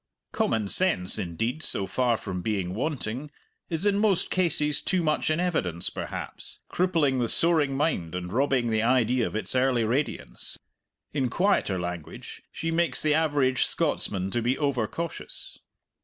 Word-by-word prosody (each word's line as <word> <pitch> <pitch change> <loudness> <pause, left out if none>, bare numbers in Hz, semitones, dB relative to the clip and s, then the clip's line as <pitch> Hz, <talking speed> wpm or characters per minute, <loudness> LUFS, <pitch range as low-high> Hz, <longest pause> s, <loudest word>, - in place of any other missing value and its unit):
Common 110 -3 0
sense, 110 - +3
indeed, 110 - -3
so 100 - +4
far 120 +1 +1
from 90 -2 -5
being 95 -3 -2
wanting, 130 +2 -3 0.4
is 165 +2 -2
in 205 -1 +3
most 200 -4 +1
cases 150 -5 +2
too 185 -3 0
much 155 -1 +1
in 155 +1 +1
evidence, 95 - -1
perhaps, - - -6
crippling 165 -8 +1
the 120 - +1
soaring 150 -2 +2
mind 90 - -1
and 90 0 -5
robbing 130 -2 +1
the 110 -1 +2
idea 125 0 +2
of - - -7
its 110 - -1
early 130 -2 +2
radiance; 115 - -2 0.6
in 135 -4 0
quieter 175 - +1
language, 90 -3 -7
she 165 - -3
makes 170 +1 +1
the 155 -1 +3
average 145 -5 +2
Scotsman 100 - -1
to 120 - 0
be 125 +3 0
over 135 -7 0
cautious. 170 +6 -7
130 Hz, 155 wpm, -26 LUFS, 110-160 Hz, 0.6 s, so